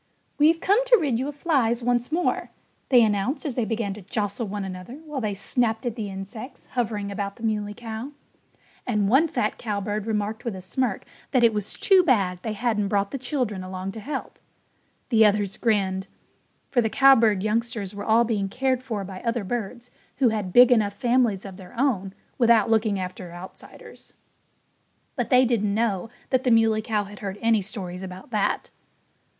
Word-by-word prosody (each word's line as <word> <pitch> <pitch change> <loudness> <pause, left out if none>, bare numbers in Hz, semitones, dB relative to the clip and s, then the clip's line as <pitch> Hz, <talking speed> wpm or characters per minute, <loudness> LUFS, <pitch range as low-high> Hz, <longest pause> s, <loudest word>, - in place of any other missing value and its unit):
"We've 320 +3 +5
come 410 +8 +3
to - - +6
rid 270 -8 0
you 265 - -2
of 290 - -6
flies 255 -6 +1
once 245 +2 0
more," 345 +3 0 0.4
they 245 -3 +7
announced 220 +8 0
as 285 - -2
they 235 -2 -1
began 220 -2 -2
to 210 - -10
jostle 205 +3 -3
one 200 0 -4
another 185 +5 -7
while 300 -4 -4
they 210 -3 -2
snapped 225 +3 0
at 235 -2 -2
the 215 -4 -4
insects 200 +7 -8
hovering 215 -5 -2
about 200 0 -4
the 230 - -13
Muley 210 -2 -1
Cow. 230 +4 -6 0.8
And 210 -5 +1
one 270 +10 +4
fat 290 -9 -2
cowbird 210 -1 -3
remarked 215 0 -2
with 235 -5 -3
a 185 - -7
smirk 235 +2 -2 0.2
that 255 -3 +2
it 230 -1 +5
was 210 -1 -2
too 385 -2 +5
bad 200 - +2
they 220 - -3
hadn't 215 -2 0
brought 200 0 0
the 275 - -4
children 245 -7 -2
along 185 +1 -5
to 220 - -8
help. 270 +5 -6 0.7
The 225 -2 +5
others 205 -2 +2
grinned; 195 -4 0 0.6
for 245 - +3
the 220 - 0
cowbird 230 -7 +5
youngsters 215 -2 -1
were 205 0 -6
all 225 +2 +4
being 210 -4 -1
cared 255 +3 0
for 220 -6 -4
by 190 -1 -8
other 230 -2 -1
birds 240 +3 -5 0.2
who 260 -4 +3
had 210 -4 -2
big 245 +4 +7
enough 215 -4 +3
families 235 -3 +1
of 190 -2 -9
their 190 +4 -11
own 200 -8 0 0.2
without 230 -3 +4
looking 215 -3 +2
after 185 -1 -6
outsiders. 175 +2 -12 1.0
But - - -2
they 255 -2 +6
didn't 210 -4 +1
know 220 -2 0 0.2
that 260 -1 +2
the 255 - +2
Muley 225 -2 +4
Cow 215 -1 -1
had 205 +1 -11
heard 195 -1 -5
any 225 -2 +3
stories 185 -3 -5
about 190 +4 -9
that. 210 -3 -1
220 Hz, 185 wpm, -25 LUFS, 200-245 Hz, 1.0 s, they